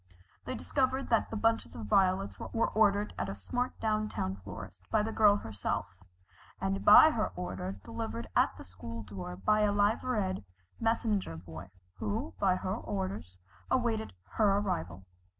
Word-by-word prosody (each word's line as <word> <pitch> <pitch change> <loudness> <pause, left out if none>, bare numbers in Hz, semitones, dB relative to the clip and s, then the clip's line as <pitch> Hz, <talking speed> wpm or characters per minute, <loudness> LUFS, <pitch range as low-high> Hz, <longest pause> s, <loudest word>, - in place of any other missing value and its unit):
They - - -3
discovered 260 - 0
that 230 - +2
the - - -5
bunches 225 +1 +1
of 110 - -6
violets 185 - +2
were 230 - -1
ordered 205 -1 +2
at 100 - -2
a 95 - -4
smart 245 - -3
down 215 -1 0
town 95 - -2
florist 95 -1 -10
by 210 - +2
the 220 - -2
girl 210 -2 +5
herself, 100 - -3 0.6
and 95 0 -1
by - - +9
her - - -1
order 90 +1 -4
delivered 115 +1 -5
at - - +3
the - - -9
school 115 +6 -8
door 90 -3 -7
by 210 - +2
a 210 -1 +3
liveried 205 - +1 0.4
messenger 220 - 0
boy, 80 +1 -9 0.3
who, 105 +2 -2
by 190 -2 +3
her 185 0 -2
orders, 95 - -4 0.3
awaited 230 -3 0
her 200 - +2
arrival. 90 - -3
115 Hz, 155 wpm, -31 LUFS, -, 0.6 s, by